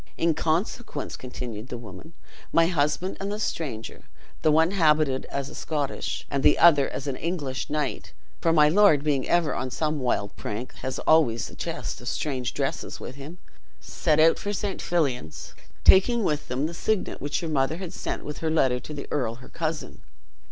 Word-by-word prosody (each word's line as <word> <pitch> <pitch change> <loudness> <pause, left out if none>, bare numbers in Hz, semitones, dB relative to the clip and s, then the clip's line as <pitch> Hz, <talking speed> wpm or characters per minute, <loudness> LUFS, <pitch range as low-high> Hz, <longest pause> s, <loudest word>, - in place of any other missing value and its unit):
"In 165 -1 +2
consequence," 160 - -2
continued 125 -3 -7
the 125 - -5
woman, 115 - -11 0.4
"my 165 - +5
husband 165 +2 0
and 195 +1 -3
the 210 - -3
stranger, 135 - -4 0.4
the 155 - +4
one 160 +3 +4
habited 155 -7 +3
as 140 -1 -4
a - - -10
Scottish 145 -3 -3
and 140 - 0
the - - +5
other 145 -5 +6
as 135 - -5
an 140 -2 -2
English 145 -4 -3
knight 150 -3 -2 0.3
(for 165 - +2
my 150 -2 +6
lord 160 -4 +5
being 145 -4 0
ever 170 -4 +3
on 130 - -3
some 155 +3 -1
wild 120 -5 -1
prank, 110 +5 -5
has 130 0 -4
always 135 -8 +3
a - - -12
chest - - -5
of 120 - -9
strange 130 -2 -2
dresses - - -3
with - - -7
him), 140 +6 -10 0.4
set 155 -2 0
out 165 +1 +5
for 205 - -3
St. 205 -1 -3
Fillan's, 125 - -2 0.3
taking 230 +5 +6
with 150 -4 -1
them 130 +4 -1
the 165 - -3
signet 210 +4 -1
which 145 +4 -2
your 165 - -3
mother 140 +2 +1
had 180 -2 -6
sent - - -4
with 150 - -6
her 160 - -1
letter 130 -6 +2
to 150 +5 -8
the 140 - -6
earl 120 -6 -1
her 125 - -14
cousin. 155 -4 -4
150 Hz, 185 wpm, -26 LUFS, 130-165 Hz, 0.4 s, other